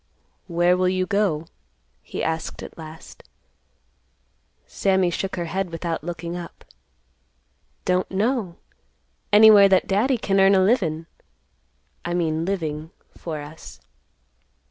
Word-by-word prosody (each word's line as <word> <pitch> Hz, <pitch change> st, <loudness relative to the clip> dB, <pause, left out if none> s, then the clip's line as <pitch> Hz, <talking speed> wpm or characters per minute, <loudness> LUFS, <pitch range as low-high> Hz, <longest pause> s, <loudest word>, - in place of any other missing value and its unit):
"Where 175 Hz, 0 st, +3 dB
will 185 Hz, 0 st, +2 dB
you 185 Hz, 0 st, 0 dB
go?" 185 Hz, -5 st, 0 dB, 0.6 s
he -, -, -6 dB
asked 160 Hz, 0 st, -3 dB
at -, -, -10 dB
last. 160 Hz, 0 st, -11 dB, 1.4 s
Sammy 190 Hz, -2 st, +1 dB
shook 190 Hz, +3 st, -3 dB
her 175 Hz, -2 st, -3 dB
head 190 Hz, +2 st, -2 dB
without 165 Hz, -1 st, -4 dB
looking 170 Hz, 0 st, -5 dB
up; 175 Hz, -1 st, -9 dB, 1.2 s
"Don't 180 Hz, 0 st, +1 dB
know; 205 Hz, -2 st, -1 dB, 0.8 s
anywhere 210 Hz, -1 st, +8 dB
that 190 Hz, -1 st, +3 dB
Daddy 235 Hz, +7 st, +1 dB
can 195 Hz, -3 st, 0 dB
earn 195 Hz, +1 st, +6 dB
a 190 Hz, -, +4 dB
livin'—I 170 Hz, -, -4 dB
mean 165 Hz, -2 st, 0 dB
living—for 160 Hz, -2 st, -5 dB
us." 150 Hz, +2 st, -11 dB
180 Hz, 110 wpm, -23 LUFS, 165-195 Hz, 1.4 s, anywhere